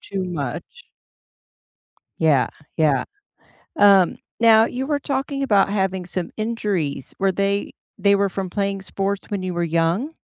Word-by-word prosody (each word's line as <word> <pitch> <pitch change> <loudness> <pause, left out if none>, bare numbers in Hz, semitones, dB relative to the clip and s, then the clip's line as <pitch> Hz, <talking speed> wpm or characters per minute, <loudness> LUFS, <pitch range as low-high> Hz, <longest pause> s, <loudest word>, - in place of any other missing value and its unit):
too 195 -1 -4
much. 145 -9 -4 1.6
Yeah, 150 -5 +3 0.3
yeah. 155 -4 +2 0.7
Um, 195 -5 +5 0.2
now, 225 -1 +6
you 255 +2 -4
were 290 -1 0
talking 275 0 -2
about 200 -6 +3
having 190 -2 -1
some 180 -1 -4
injuries. 205 - -2
Were 195 0 +2
they 200 +1 -1 0.2
they 200 +1 +4
were 200 0 +2
from 190 -1 -4
playing 195 0 -2
sports 195 +1 -3
when 200 -2 -3
you 185 -1 -3
were 175 0 -1
young? 170 - 0
195 Hz, 140 wpm, -22 LUFS, 175-215 Hz, 1.6 s, now